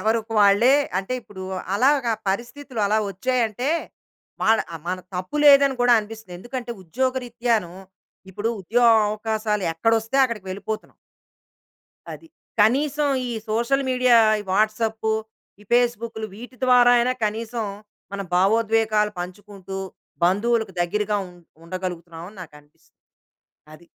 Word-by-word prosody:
ఎవరికి 225 +1 -1
వాళ్ళే 205 +7 +5 0.2
అంటే, 195 +6 -4
ఇప్పుడు 195 -5 -11 0.3
అలాగ 265 +4 +3 0.2
పరిస్థితులు 240 +4 -4
అలా 215 +2 +2
వచ్చాయి 255 +6 -1
అంటే, 245 +6 -3 0.7
వాళ్ళ 225 0 +4 0.2
ఆహ్, 160 - -9
మన 185 +1 -2 0.2
తప్పు 185 +10 -4
లేదని 280 -1 +7
కూడా 245 0 +5
అనిపిస్తుంది. 215 -4 -10
ఎందుకంటే, 240 +3 -6
ఉద్యోగరీత్యాను, 240 -2 -1 0.6
ఇప్పుడు 205 +4 -3
ఉద్యోగ 235 +6 +3 0.2
అవకాశాలు 215 -1 -2
ఎక్కడ 225 +8 +1
వొస్తే, 225 +5 -4
అక్కడికి 225 -6 -4
వెళ్ళిపోతున్నాం. 210 +3 -6 1.2
అది. 330 - -11 0.3
కనీసం 285 +6 +2 0.2
ఈ - - -4 0.2
సోషల్ 235 +5 +1
మీడియా, 250 -1 +4 0.2
ఈ - - -6
వాట్సాపు, 220 +1 0 0.5
ఈ - - -15
పేస్‌బుక్‌లు, 235 -2 +1
వీటి 245 +4 -11
ద్వారా 245 -1 +6
అయినా 250 +2 +2
కనీసం 225 +2 -3 0.5
మన 200 - -4
భావోద్వేగాలు 215 +2 +2
పంచుకుంటూ, 195 +1 -8 0.5
బంధువులకు 220 +3 +1
దగ్గరగా 210 +4 0
ఉం 180 - -16 0.3
ఉండగలుగుతున్నాం 170 -2 -6
అని 215 - -18
నాకనిపిస్తుంది. 150 -2 -18 0.8
అది. 170 +2 -15
220 Hz, 120 wpm, -23 LUFS, 200-245 Hz, 1.2 s, లేదని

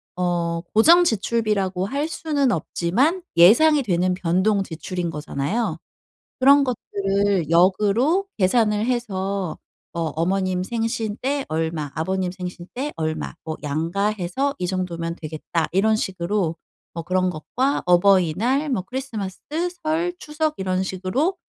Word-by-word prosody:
어 170 -2 -1
고정 330 +11 +7
지출비라고 210 - 0
할 280 +8 -2
수는 295 -5 0
없지만 245 - 0
예상이 280 - +6
되는 180 -3 +1
변동 185 +4 +1
지출인 175 0 -4
거잖아요. 160 +6 -2 0.6
그런 280 +2 +6
것들을 200 - 0
역으로 210 - +3
계산을 210 +1 +2
해서 200 -7 -2 0.4
'뭐 165 -2 -2
어머님 185 +2 0
생신 225 0 -2
때 275 +1 -1
얼마, 160 -2 -2
아버님 185 +2 -1
생신 180 -1 -7
때 280 +4 -3
얼마 155 -1 -3
뭐 160 -1 -5
양가 165 +7 -1
해서 215 +8 -1
이 180 - -1
정도면 170 -2 -3
되겠다.' 160 +1 -3
이런 215 +4 +3
식으로 185 -3 -1 0.4
뭐 165 - -5
그런 185 +2 +1
것과 250 - -1
어버이날, 195 - +3
뭐 240 -9 -1
크리스마스, 220 -4 -5 0.4
설, 325 +3 0
추석 310 -2 -2
이런 185 -1 -1
식으로 190 - -1
190 Hz, 275 characters per minute, -22 LUFS, 175-245 Hz, 0.6 s, 고정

